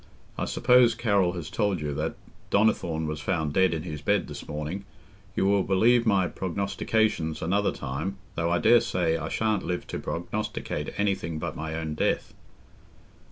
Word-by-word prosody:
I - - -2
suppose 125 -2 +4
Carroll 100 -7 +2
has 85 -4 -6
told 100 -5 0
you 75 -1 -3
that - - -2 0.3
Donnithorne 85 -6 +2
was 75 0 -3
found 80 -3 -1
dead 95 +2 +4
in 80 -2 -2
his 75 -4 -6
bed 100 +4 +1
this - - -8
morning. 75 +6 -4 0.5
You - - +1
will 100 0 +4
believe 115 +6 +3
my 100 -3 +4
prognostications 95 -2 -1
another 100 +5 +1
time, 80 +10 -4 0.2
though 85 0 -1
I 85 - +2
daresay 90 -6 +3
I - - -3
shan't 110 -3 0
live 90 0 -3
to - - -5
prognosticate - - -3
anything 95 -6 -1
but 85 +2 -4
my 80 0 -4
own 80 -1 -3
death." 75 - 0
90 Hz, 160 wpm, -27 LUFS, 80-100 Hz, 0.5 s, suppose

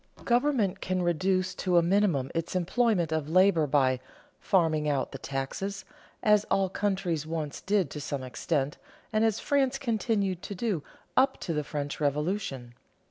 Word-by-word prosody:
Government 240 -5 +2
can 185 0 -1
reduce 185 +2 +1
to 180 -2 +1
a 170 - +5
minimum 170 -8 +2
its 165 +2 -3
employment 185 -2 +1
of 155 -2 -1
labor 185 -3 +4
by 130 -3 +2 0.4
"farming 160 -6 +2
out" 140 -2 0
the 135 - -7
taxes, 190 +10 -4 0.4
as 210 -1 +5
all 195 -1 +1
countries 185 -6 -1
once 155 -3 -4
did 195 -6 +1
to 150 - -5
some 140 -1 -4
extent, 135 +3 -2 0.3
and 215 +1 +3
as 220 -2 +2
France 270 -2 +1
continued 215 -7 0
to 200 - -6
do 195 -5 -1 0.3
up 265 - +3
to 170 - -2
the 150 -1 -1
French 145 0 -4
Revolution. 145 - -1
180 Hz, 155 wpm, -28 LUFS, 150-205 Hz, 0.4 s, a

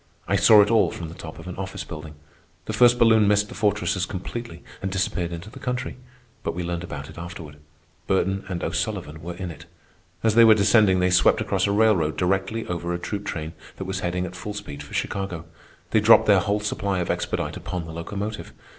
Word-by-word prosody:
I 100 - +2
saw 105 +3 +7
it 105 - -1
all 115 -2 +4
from 85 -2 -7
the - - -9
top 80 -2 -9
of 80 +2 -10
an 90 - -6
office 95 0 -5
building. 75 -1 -9 0.5
The - - -4
first 120 0 +5
balloon 110 -3 +5
missed 105 0 +3
the - - -8
fortresses 100 -3 0
completely 95 -2 -6 0.2
and 95 - -3
disappeared 90 -2 -1
into 85 +5 -7
the - - -11
country; 125 0 -3 0.5
but - - -3
we 90 - -3
learned 85 0 -3
about 75 -4 -7
it - - -11
afterward. 85 -4 -8 0.5
Burton 95 0 +1
and 90 -2 -3
O'Sullivan 85 -3 -3
were 85 +1 -6
in 90 -1 -5
it. - - -12 0.6
As 110 -1 +3
they 115 +1 +7
were 110 -1 +8
descending 100 -2 +4
they 90 0 +2
swept 90 - +4
across - - 0
a - - +1
railroad 100 -8 +3
directly 95 +4 0
over 85 -1 -3
a - - -1
troop 100 +3 -5
train 80 -2 -4 0.2
that 95 - -5
was 95 0 -3
heading 90 0 -2
at 90 0 -8
full 100 +3 -6
speed 70 -9 -7
for 70 - -9
Chicago. 90 -5 -3 0.5
They - - +4
dropped - - +6
their - - +5
whole 105 +1 0
supply 100 -2 -1
of 90 - 0
expedite - - -2
upon 90 -2 -5
the 80 - -8
locomotive. 100 +6 -5
95 Hz, 215 wpm, -24 LUFS, 85-105 Hz, 0.6 s, were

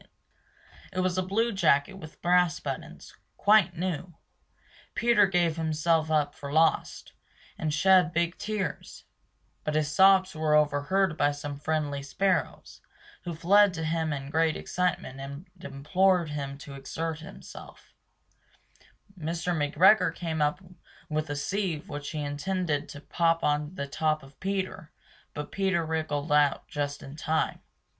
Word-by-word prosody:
It 185 -1 -1
was 185 -1 0
a 185 - +1
blue 215 +6 0
jacket 165 -3 +2
with 160 -5 -12
brass 180 -1 +3
buttons, - - -7 0.2
quite 200 -5 +4
new. 175 -1 -3 0.8
Peter 235 -4 +4
gave 175 -3 +1
himself 160 0 +1
up 150 -2 +1
for 140 0 -8
lost 160 +2 +1 0.4
and 155 - -2
shed 180 +2 +4
big 170 +1 0
tears; 210 -2 -4 0.6
But 155 - -2
his 150 -1 +1
sobs 190 +2 +5
were 155 -1 +1
overheard 150 +4 +2
by 145 0 +3
some 145 0 -6
friendly 150 -2 -1
sparrows 185 +6 -2 0.4
Who 170 -2 -4
flew 200 +6 +5
to 170 -3 -5
him 160 0 -1
in 140 -1 -5
great 160 0 +2
excitement 180 -7 -2
and 140 +6 -8 0.2
implored 170 +5 +1
him 140 -2 -5
to 140 - -9
exert 160 +4 -4
himself. 160 - -12 1.2
Mr. 170 +1 -2
McGregor 165 +4 +4
came 160 -3 -3
up 150 +5 0 0.5
with 155 0 -2
a 145 - -2
sieve 175 0 -2
which 145 0 -5
he 155 - -4
intended 150 +1 -2
to 145 - -9
pop 165 +1 +1
on 150 +3 0
the 140 - -3
top 155 +2 -1
of 135 +1 -17
Peter, 190 -3 -3 0.4
but 150 0 -6
Peter 190 -4 0
wriggled 155 -2 -2
out 150 -1 +3
just 145 -1 -4
in 135 - -9
time. 155 +1 -1
160 Hz, 140 wpm, -28 LUFS, 150-185 Hz, 1.2 s, sobs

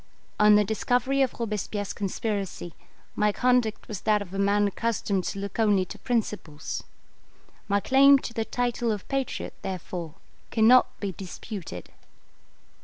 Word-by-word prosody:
On 210 0 +7
the 210 - +5
discovery 245 +6 +1
of 260 -2 0
Robespierre's 210 -3 -3
conspiracy, 195 -3 -3 0.4
my 210 0 +2
conduct 245 -1 +1
was 210 -3 -6
that 215 -1 +3
of 195 -2 -8
a 195 - -3
man 200 +1 +3
accustomed 200 -3 -1
to - - -3
look 200 +2 -5
only 205 -4 +3
to - - -10
principles. 210 - -3 0.9
My 200 0 +2
claim 275 +5 +6
to 240 - -6
the 225 - -1
title 240 0 -1
of 210 -3 -4
patriot, 270 -1 -2
therefore 175 -3 -5 0.3
cannot 230 +3 +4
be 200 -2 -2
disputed. 185 - -8
210 Hz, 140 wpm, -26 LUFS, 195-235 Hz, 0.9 s, On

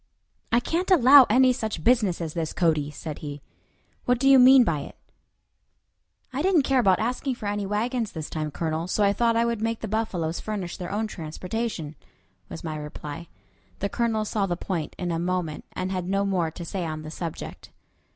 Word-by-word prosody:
"I 235 - +5
can't 340 +9 -2
allow 275 -6 +8
any 255 +3 +5
such 220 -9 -4
business 215 -8 +2
as 160 -2 -4
this, 165 -2 -3
Cody," 155 -4 +1
said 150 0 -7
he. 145 -1 -6 0.7
"What 250 0 +3
do 270 +3 +1
you 270 -1 +8
mean 255 +1 +8
by 165 -9 0
it?" 140 - -9 1.4
"I 270 - -1
didn't 355 -4 +3
care 265 -1 +2
about 195 -6 +4
asking 250 +3 -2
for 230 - -9
any 205 -1 -2
wagons 225 +2 -1
this 160 -2 -6
time, 155 -1 -3
Colonel, 160 +2 -3
so 205 +3 +1
I 200 0 +4
thought 230 +1 +2
I 230 +1 +3
would 235 -2 -1
make 225 0 -2
the 220 - -3
buffaloes 190 -7 -2
furnish 200 -5 -4
their 180 0 -6
own 210 +2 -1
transportation," 180 -1 -4 0.6
was - - -8
my 155 -2 -4
reply. 150 +2 -7 0.5
The 200 - -2
Colonel 225 -1 0
saw 205 -2 -1
the 175 -2 -2
point 170 -4 -4
in 175 -1 -3
a 165 - -1
moment, 175 -3 -2
and 185 +1 -3
had 185 -1 -3
no 195 +1 +1
more 180 -4 0
to 170 +2 -8
say 185 +2 -3
on 155 -1 -4
the 155 - -8
subject. 165 -1 -7
195 Hz, 200 wpm, -25 LUFS, 165-235 Hz, 1.4 s, allow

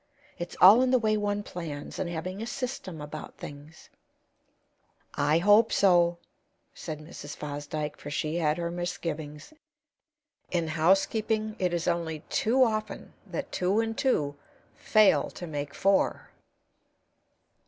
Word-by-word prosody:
It's 175 0 -6
all 205 +7 +9
in 260 - +2
the 255 - +5
way 215 -3 +1
one 205 0 -1
plans, 160 -7 -7
and 185 - -2
having 180 +4 -5
a 225 - -4
system 240 - -5
about 150 +1 -8
things." 145 +2 -11 1.2
"I 145 +2 +2
hope 205 +6 +5
so," 175 -3 +4 0.6
said 155 -3 -6
Mrs. 150 -1 -9
Fosdyke; 150 +1 -5
for 145 - -8
she 155 +2 -2
had 155 -2 +1
her 170 -1 -2
misgivings. 160 - -5 1.0
In 170 -3 -1
housekeeping 215 +6 +1
it 180 -1 +1
is 170 0 -2
only 165 -3 -1
too 255 +4 +3
often 215 -2 -2
that - - -5
two 185 +4 +1
and 225 0 -1
two 150 - 0 0.4
fail 215 -2 +3
to 175 - -6
make 145 -3 -5
four. 195 0 +1
175 Hz, 130 wpm, -28 LUFS, 155-205 Hz, 1.2 s, all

